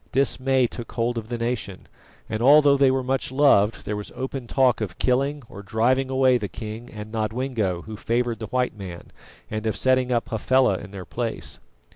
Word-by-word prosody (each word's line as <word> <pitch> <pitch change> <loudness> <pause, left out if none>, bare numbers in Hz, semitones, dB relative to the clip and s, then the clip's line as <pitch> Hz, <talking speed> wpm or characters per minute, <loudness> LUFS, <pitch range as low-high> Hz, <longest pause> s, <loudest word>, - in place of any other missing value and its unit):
Dismay 135 -1 +2
took 120 0 -7
hold 120 0 0
of 110 0 -11
the 120 - -2
nation, 115 -5 -3 0.4
and 110 0 -3
although 145 +2 +7
they 135 -1 +4
were 130 0 +1
much 130 0 -1
loved, 130 -6 +3
there 105 - -2
was 105 0 -6
open 130 -1 -5
talk 130 -2 +2
of 95 -5 -4
killing 140 +3 0
or 100 - -10
driving 125 +6 +1
away 130 -1 +3
the 105 - -3
king 110 +3 -8
and 105 0 -8
Nodwengo 110 -4 -2
who 110 - -8
favoured 120 +2 -1
the 110 - -5
white 125 +1 -1
man, 95 -4 -9 0.4
and 110 +1 -3
of 110 - 0
setting 130 -1 +2
up 120 -1 0
Hafela 115 -2 +2
in - - -10
their 95 -2 -8
place. 100 - -4
120 Hz, 190 wpm, -24 LUFS, 110-130 Hz, 0.4 s, although